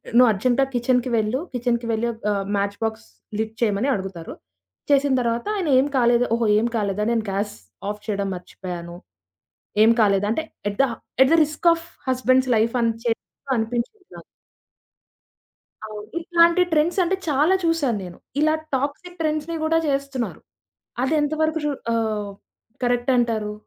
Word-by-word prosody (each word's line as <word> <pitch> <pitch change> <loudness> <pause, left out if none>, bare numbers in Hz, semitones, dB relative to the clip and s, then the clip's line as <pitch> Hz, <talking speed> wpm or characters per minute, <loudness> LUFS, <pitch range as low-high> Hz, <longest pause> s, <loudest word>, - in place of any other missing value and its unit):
నువ్వు 250 0 +7
అర్జెంటా 245 +6 +2
కిచెన్‌కి 250 +1 +1
వెళ్ళు. 220 +4 0
కిచెన్‌కి 240 -1 -1
వెళ్ళి 225 +2 0
ఒక 225 - -16
ఆహ్, 200 -1 -2
మ్యాచ్ 200 0 -1
బాక్స్ 220 0 -4 0.3
లిట్ 220 0 -2
చేయమని 220 +3 +1
అడుగుతారు. 190 -4 -6 0.6
చేసిన 280 -1 +4
తర్వాత 235 0 -1
ఆయన 380 -5 -2
ఏం 275 - +2
కాలేదు. 240 0 +4
ఓహో! 230 -1 0
ఏం 230 - +1
కాలేదా? 205 -1 -1
నేను 230 -2 +1
గ్యాస్ 200 +2 -2 0.3
ఆఫ్ 210 0 -5
చేయడం 200 -2 -1
మర్చిపోయాను. 175 -1 -7 0.9
ఏం 225 - +6
కాలేదు. 200 -1 +3
అంటే 230 +9 0 0.3
at 200 - -7
the, - - +5 0.4
at 265 - +7
the 330 - +6
risk 305 +3 -3
of 330 0 -6 0.2
husbands 255 0 +2
life 225 +1 +2
అని 230 -1 +3
చేప్పనిపించుకున్న. 240 - -3 1.6
అవును. 210 -1 -8
ఇట్లాంటి 340 +1 +4
ట్రెండ్సంటే 340 +4 +2
చాలా 300 +6 +3
చూసాను 325 -9 +1
నేను. 175 -1 -10 0.2
ఇలా 310 +1 +4 0.2
టాక్సిక్ 285 +7 -4
ట్రెండ్స్‌నీ 310 +1 -1
గూడా 320 +1 +2
చేస్తున్నారు. 275 -3 -2 0.6
అది 265 +4 0
ఎంతవరకు 315 +2 0
రూ 295 - +1 0.2
ఆహ్ 215 -3 -1 0.5
కరెక్టంటారు? 240 -3 +1
240 Hz, 140 wpm, -23 LUFS, 215-290 Hz, 1.6 s, నువ్వు